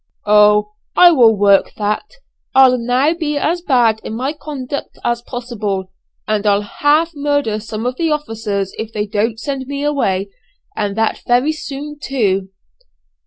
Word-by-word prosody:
"Oh! 210 0 +4 0.3
I 355 -1 +8
will 235 -8 +5
work 200 -1 +3
that. 215 - -2 0.4
I'll 260 -2 +6
now 250 +6 +2
be 310 -3 -2
as 335 +4 0
bad 240 -8 +2
in 220 - -5
my 260 +5 -2
conduct 285 -3 -6
as 235 0 0
possible; 215 -7 -4 0.4
and 215 -1 0
I'll 205 0 +3
half 295 +9 +1
murder 285 -7 -1
some 215 +1 -6
of 250 +1 -2
the 330 -1 0
officers 225 -9 -2
if 220 0 -5
they 210 -1 -2
don't 215 +2 -1
send 265 +2 -4
me 280 0 -4
away; 200 -10 0 0.4
and 205 -2 -2
that 225 0 0
very 250 +5 +3
soon 295 -1 -7
too." 195 -9 0
240 Hz, 155 wpm, -17 LUFS, 210-285 Hz, 0.4 s, I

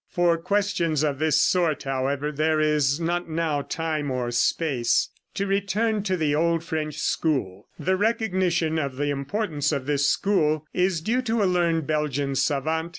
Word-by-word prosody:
For 175 -2 +2
questions 175 -5 0
of 145 -3 -1
this 155 0 +3
sort, 170 -5 +2
however, 135 +2 -1
there 155 +1 +1
is 150 -2 +2
not 175 +1 -2
now 160 -2 -1
time 155 -1 -3
or 125 -2 -2
space. 120 0 +1 0.3
To 200 - -1
return 200 +2 0
to 190 -2 -1
the 155 -3 +1
old 165 +2 +1
French 155 -2 -3
school 130 - -1
the 190 +1 0
recognition 185 -7 +1
of 140 -3 -3
the 145 +2 -1
importance 145 +2 -2
of 140 -4 -2
this 145 0 +1
school 155 -6 +1
is 180 -2 +1
due 235 +9 0
to 230 -3 0
a - - +3
learned 170 -4 +1
Belgian 145 -2 -1
savant, 155 +4 0
M. - - -9
160 Hz, 165 wpm, -25 LUFS, 145-180 Hz, 0.3 s, this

